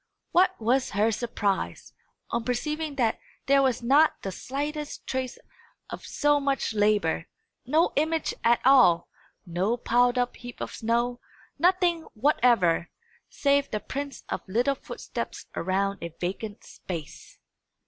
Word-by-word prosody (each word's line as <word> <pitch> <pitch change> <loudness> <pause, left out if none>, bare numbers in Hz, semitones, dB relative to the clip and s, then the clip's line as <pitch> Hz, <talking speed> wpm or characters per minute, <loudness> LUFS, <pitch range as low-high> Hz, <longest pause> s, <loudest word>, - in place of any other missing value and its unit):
What 370 +1 +3
was 250 +4 +1
her 215 +3 +3
surprise, 205 -3 -2 0.4
on 235 0 -1
perceiving 300 +5 -2
that 235 -5 +1 0.3
there 275 +1 +5
was 255 -3 +1
not 285 +6 +4
the 195 - -3
slightest 290 +8 -5
trace 260 -1 -3 0.5
of - - -7
so 290 0 +2
much 275 -4 -1
labour! 205 -6 +1 0.4
no 315 +6 +3
image 315 +2 0
at 235 +1 +4
all 250 -11 +6 0.4
no 185 +7 0
piled 245 +1 +2
up 245 0 0
heap 245 -1 -10
of - - -5
snow 235 +2 0 0.4
nothing 350 0 +3
whatever, 225 - +3 0.4
save 280 0 +1
the 215 - -2
prints 280 +6 -6
of - - -3
little 240 +8 +2
footsteps 270 - -6
around 195 +2 0
a 170 - -5
vacant 205 +4 -4
space! 165 -5 -8
245 Hz, 130 wpm, -27 LUFS, 210-280 Hz, 0.5 s, all